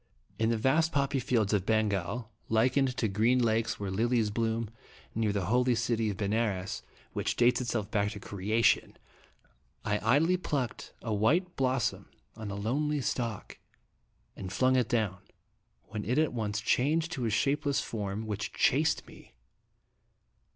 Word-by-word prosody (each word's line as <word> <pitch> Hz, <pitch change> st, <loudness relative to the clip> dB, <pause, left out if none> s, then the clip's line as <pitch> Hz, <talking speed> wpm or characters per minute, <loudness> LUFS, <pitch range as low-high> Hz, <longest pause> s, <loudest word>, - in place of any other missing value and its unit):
In 110 Hz, 0 st, +2 dB
the 115 Hz, -, +1 dB
vast 155 Hz, +8 st, +2 dB
poppy 140 Hz, -2 st, +1 dB
fields 115 Hz, -4 st, +1 dB
of 100 Hz, -3 st, +2 dB
Bengal, 110 Hz, +1 st, 0 dB, 0.2 s
likened 125 Hz, +3 st, +2 dB
to 115 Hz, -, +1 dB
green 110 Hz, +5 st, +2 dB
lakes 115 Hz, -2 st, +1 dB
where 100 Hz, -2 st, -3 dB
lilies 115 Hz, +1 st, +1 dB
bloom, 115 Hz, 0 st, -1 dB, 0.4 s
near 110 Hz, -1 st, +1 dB
the 100 Hz, -3 st, -1 dB
holy 125 Hz, +4 st, +2 dB
city 115 Hz, -1 st, 0 dB
of 100 Hz, -, -4 dB
Benares, 105 Hz, -2 st, -1 dB, 0.3 s
which -, -, -1 dB
dates 125 Hz, +1 st, +3 dB
itself 115 Hz, -4 st, -2 dB
back 105 Hz, -2 st, +1 dB
to 100 Hz, -, -8 dB
creation, 105 Hz, +4 st, +1 dB, 0.9 s
I 105 Hz, 0 st, +1 dB
idly 150 Hz, +11 st, +3 dB
plucked 140 Hz, -8 st, -3 dB
a 115 Hz, -, -2 dB
white 165 Hz, -, +2 dB
blos 130 Hz, -2 st, +1 dB
som -, -, -2 dB, 0.3 s
on 110 Hz, -2 st, -6 dB
a 100 Hz, -, -4 dB
lonely 140 Hz, +8 st, 0 dB
stalk, 115 Hz, -5 st, -3 dB, 0.8 s
and 95 Hz, -1 st, -6 dB
flung 130 Hz, +6 st, +3 dB
it 125 Hz, -2 st, +2 dB
down, 110 Hz, -6 st, 0 dB, 0.6 s
when 105 Hz, -1 st, -6 dB
it 125 Hz, +6 st, -1 dB
at 155 Hz, -3 st, +2 dB
once 105 Hz, -3 st, -2 dB
changed 155 Hz, +9 st, +1 dB
to 130 Hz, -8 st, -2 dB
a -, -, +1 dB
shapeless 140 Hz, +5 st, +1 dB
form, 105 Hz, -1 st, -4 dB
which 105 Hz, -1 st, -4 dB
chased 150 Hz, +4 st, +2 dB
me. -, -, -16 dB
115 Hz, 155 wpm, -30 LUFS, 105-130 Hz, 0.9 s, dates